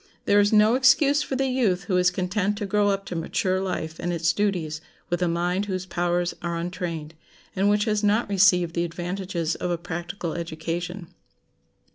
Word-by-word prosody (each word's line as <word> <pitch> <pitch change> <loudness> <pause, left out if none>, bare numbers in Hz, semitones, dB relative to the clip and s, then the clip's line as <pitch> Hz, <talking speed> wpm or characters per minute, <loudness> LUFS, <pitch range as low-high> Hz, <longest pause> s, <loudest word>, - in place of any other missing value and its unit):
There 205 - +4
is 205 0 +3
no 215 +1 +5
excuse 275 +3 +4
for 275 - -3
the 270 +1 +1
youth 235 -8 +1
who 195 - -1
is 180 0 +4
content 190 +3 -1
to 205 - -3
grow 205 +1 +2
up 195 0 -1
to 180 - -6
mature 185 +3 -1
life 165 -4 -4
and 175 - -2
its 165 -1 +1
duties 170 -7 -1 0.3
with 175 - 0
a 180 - +2
mind 175 +4 0
whose 185 -2 -3
powers 175 0 -1
are 170 -1 -2
untrained, 170 -3 -4 0.4
and 195 +1 +2
which 210 +1 +2
has 215 -1 0
not 210 +3 +2
received 180 -4 +3
the 170 - 0
advantages 175 -1 -3
of 180 - -3
a 175 - 0
practical 175 +1 -5
education. 170 +2 -5
180 Hz, 185 wpm, -25 LUFS, 170-205 Hz, 0.4 s, no